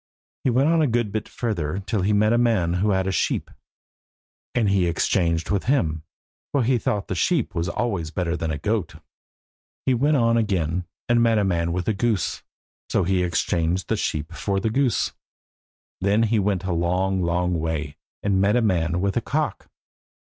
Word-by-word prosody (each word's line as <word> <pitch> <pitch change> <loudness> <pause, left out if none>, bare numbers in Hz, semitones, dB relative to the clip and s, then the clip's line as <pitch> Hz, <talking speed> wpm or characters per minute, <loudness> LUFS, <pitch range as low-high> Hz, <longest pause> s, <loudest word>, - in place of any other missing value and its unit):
He - - +2
went 130 +4 +3
on 165 0 +3
a 155 - +3
good 120 -3 0
bit 110 0 -3
further 95 -8 -2
till 100 +1 -2
he 100 +3 +1
met 105 +2 +3
a 120 - +3
man 105 -8 +2
who 105 - +2
had 95 -2 +1
a 95 - 0
sheep, - - -1 1.0
and 115 -4 +2
he 95 -3 +2
exchanged 85 -1 0
with 100 -2 0
him, 80 - +1 0.5
for 140 -3 +2
he 125 +1 +2
thought 105 -2 -2
a - - +2
sheep 140 - +1
was 85 -1 -1
always 95 -10 -2
better 85 0 -2
than 80 -2 -3
a 80 - -2
goat. 100 +2 -2 0.9
He 130 - +3
went 145 +5 +2
on 115 -2 +3
again, 90 -5 0 0.2
and 120 0 +3
met 115 -1 +3
a 105 - +2
man 85 -3 0
with 90 0 -2
a 110 - +2
goose. 105 -2 -1 0.5
So 100 - +2
he 95 +1 +1
exchanged 85 +1 0
the - - +2
sheep 75 +2 -3
for 95 +5 -1
the 110 +3 -1
goose. 130 0 +1 0.9
Then 100 +4 +2
he 110 0 +2
went 100 -1 0
a 95 -1 -1
long, 90 +3 0
long 90 0 0
way, 80 -2 -3 0.3
and 95 -2 +2
met 100 +3 +3
a 125 - +3
man 85 -4 +1
with 100 -1 0
a - - +2
cock. - - -2
95 Hz, 195 wpm, -23 LUFS, 85-115 Hz, 1.0 s, went